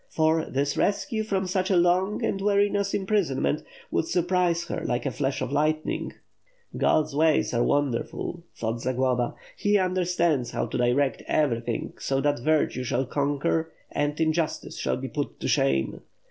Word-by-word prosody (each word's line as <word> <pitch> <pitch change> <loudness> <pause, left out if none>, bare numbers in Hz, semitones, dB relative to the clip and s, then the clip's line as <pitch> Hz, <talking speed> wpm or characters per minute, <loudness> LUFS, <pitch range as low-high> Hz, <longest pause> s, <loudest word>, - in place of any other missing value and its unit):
For 160 0 +2
this 140 +1 -1
rescue 220 +3 0
from 195 -3 -1
such 185 0 0
a 190 - +3
long 180 +4 +2
and 195 - -1
wearisome 200 0 +2
imprisonment 180 -8 0 0.3
would 165 - 0
sur 175 - +1
prise 175 -1 +1
her, - - -4
like 120 -1 -1
a - - 0
flash 135 -1 -1
of - - -4
lightning... 155 +2 0 0.6
"God's 155 -2 +2
ways 155 -2 +3
are 120 - +2
wonderful," 145 +4 -1
thought 115 +1 -3
Zagloba; 125 -1 0 0.2
"He 205 0 +2
understands 180 -7 +1
how - - -1
to - - -4
direct 130 +3 +2
everything 120 -6 0
so 135 0 0
that 145 -2 +1
virtue 150 -1 +1
shall 125 +2 0
conquer 145 +4 0 0.2
and 145 +1 -1
injustice 160 0 -1
shall - - 0
be - - -5
put - - -4
to - - -3
shame. 70 -1 +1
155 Hz, 160 wpm, -26 LUFS, 135-180 Hz, 0.6 s, a